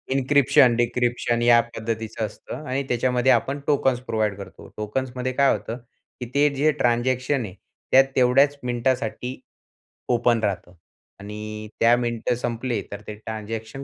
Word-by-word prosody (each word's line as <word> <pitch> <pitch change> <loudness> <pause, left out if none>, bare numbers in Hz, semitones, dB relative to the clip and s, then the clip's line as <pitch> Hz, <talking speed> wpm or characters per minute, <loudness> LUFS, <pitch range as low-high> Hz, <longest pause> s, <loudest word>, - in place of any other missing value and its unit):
Encryption, 135 -2 +4
decryption 120 0 0
या 120 0 +6
पद्धतीचं 115 -1 -4
असतं 135 +6 -9
आणि 135 +2 -1
त्याच्यामध्ये 125 +1 +2
आपण 140 +1 +1
टोकन्स 135 -4 +2
प्रोव्हाईड 110 -3 -1
करतो. 100 - -11
टोकन्समध्ये 125 +4 -3
काय 140 +1 +4
होतं 115 +2 -3 0.4
की 125 - -4
ते 145 +1 +4
जे 155 +3 +3
ट्रान्झॅक्शन 130 +1 +1
आहे, 95 - -9 0.4
त्यात 135 +1 +8
तेवढ्याच 135 +3 +4
मिनिटासाठी 125 0 -2 0.7
ओपन 120 -1 +3
राहतं 90 -3 -2 0.5
आणि 105 +1 -7
त्या 115 +1 +5
मिनिट 120 0 -1
संपली 120 -2 -2
तर 100 0 -7
ते 105 - -6
ट्रान्झॅक्शन 110 +4 -6
120 Hz, 135 wpm, -23 LUFS, 110-130 Hz, 0.7 s, त्यात